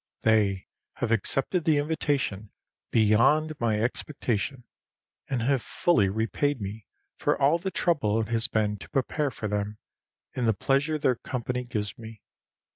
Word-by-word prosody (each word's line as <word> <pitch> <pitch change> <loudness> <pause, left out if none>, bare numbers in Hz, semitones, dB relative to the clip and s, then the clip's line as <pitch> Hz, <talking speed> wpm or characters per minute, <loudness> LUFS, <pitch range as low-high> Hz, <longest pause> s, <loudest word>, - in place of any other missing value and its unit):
They 105 -4 +2 0.3
have - - -3
accepted 135 - 0
the 155 -3 +3
invitation 145 - -1 0.4
beyond 120 +9 +4
my 110 -3 +1
expectation, 125 +1 -2 0.7
and 125 -4 -1
have 135 0 +2
fully 110 - +2
repaid 115 +7 0
me 105 +1 -6 0.3
for - - +1
all 145 +5 +4
the 190 +3 -2
trouble 140 - +1
it 110 - -2
has 115 -1 +4
been 105 -1 0
to - - -12
prepare 140 +2 0
for 110 -3 -5
them, 105 +1 -2 0.6
in 125 - -1
the 110 - +3
pleasure 140 +8 +1
their 130 -5 +1
company 125 0 -3
gives 105 -5 -4
me. 110 -2 -11
115 Hz, 145 wpm, -27 LUFS, 105-145 Hz, 0.7 s, beyond